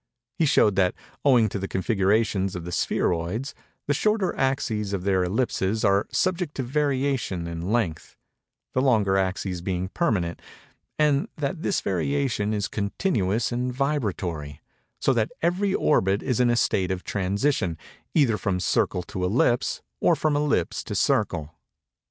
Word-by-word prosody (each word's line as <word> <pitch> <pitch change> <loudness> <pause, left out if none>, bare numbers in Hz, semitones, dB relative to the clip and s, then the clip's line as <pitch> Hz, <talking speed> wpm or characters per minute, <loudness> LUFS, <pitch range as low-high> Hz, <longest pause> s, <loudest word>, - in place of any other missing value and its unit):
He 160 - +1
showed 105 -7 +4
that, 90 -2 +3 0.3
owing 125 -6 +5
to 100 - -4
the 95 - -3
configurations 95 0 +1
of 85 -2 -5
the 90 - -5
spheroids, 90 +10 -1 0.3
the 145 - +1
shorter 210 +4 +1
axes 115 -7 -1
of 95 -2 -2
their 95 -1 +2
ellipses 105 +1 0
are 100 0 +3
subject 180 -4 0
to 135 - -2
variation 135 - 0
in 85 -1 -5
length; 95 -9 -1 0.6
the 130 - +2
longer 110 -7 +3
axes 95 -1 -1
being 90 0 -2
permanent; 95 - -1 0.6
and 150 -2 +2
that 150 +3 -3
this 195 - 0
variation 110 +2 0
is 105 -2 -1
continuous 105 - -1
and 125 +1 -1
vibratory—so 100 - -2
that 115 -3 +1
every 190 +3 +1
orbit 100 -8 +2
is 125 -3 0
in 125 -1 +4
a 120 - +3
state 95 -5 +1
of 95 -1 -3
transition, 100 - 0 0.4
either 125 -9 +3
from 95 -2 -1
circle 90 0 +1
to 90 - -5
ellipse, 120 +5 +1 0.2
or - - +4
from 155 -2 0
ellipse 145 - 0
to - - -4
circle. 75 +1 0
105 Hz, 145 wpm, -25 LUFS, 95-135 Hz, 0.6 s, owing